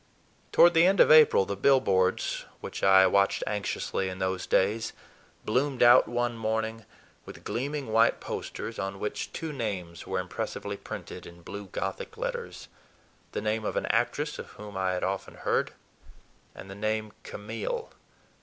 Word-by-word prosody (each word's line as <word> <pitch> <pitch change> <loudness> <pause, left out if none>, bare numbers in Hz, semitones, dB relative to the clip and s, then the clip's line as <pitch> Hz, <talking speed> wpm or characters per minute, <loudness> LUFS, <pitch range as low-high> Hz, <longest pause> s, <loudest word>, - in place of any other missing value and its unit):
Toward 175 0 +7
the 165 +2 +6
end 195 +1 +2
of - - +7
April, 155 -10 +7
the 100 - -3
billboards, 100 -6 +2
which - - -7
I 95 0 +7
watched 100 +1 +2
anxiously 100 -2 -2
in 95 - -6
those 95 -1 -2
days, 110 +4 +1 0.5
bloomed 130 +3 +1
out 120 0 +7
one 120 0 -1
morning 110 0 -2 0.4
with - - -12
gleaming 135 -1 -3
white 115 - +4
posters 115 0 -6
on 95 0 -4
which 105 - -4
two 160 -2 -5
names 95 - -5
were 95 - -2
impressively 90 0 -4
printed - - -8
in 85 0 -14
blue 100 +2 -7
Gothic 95 - -5
letters: 485 0 -5 0.7
the - - -2
name 110 +1 -1
of - - -3
an - - 0
actress - - -1
of - - -7
whom 105 -1 -10
I 95 -1 0
had 90 - -2
often 95 0 -3
heard, - - 0 0.8
and - - -10
the 95 - -8
name 110 +1 -2
"Camille." 475 - -5
105 Hz, 155 wpm, -28 LUFS, 95-125 Hz, 0.8 s, Toward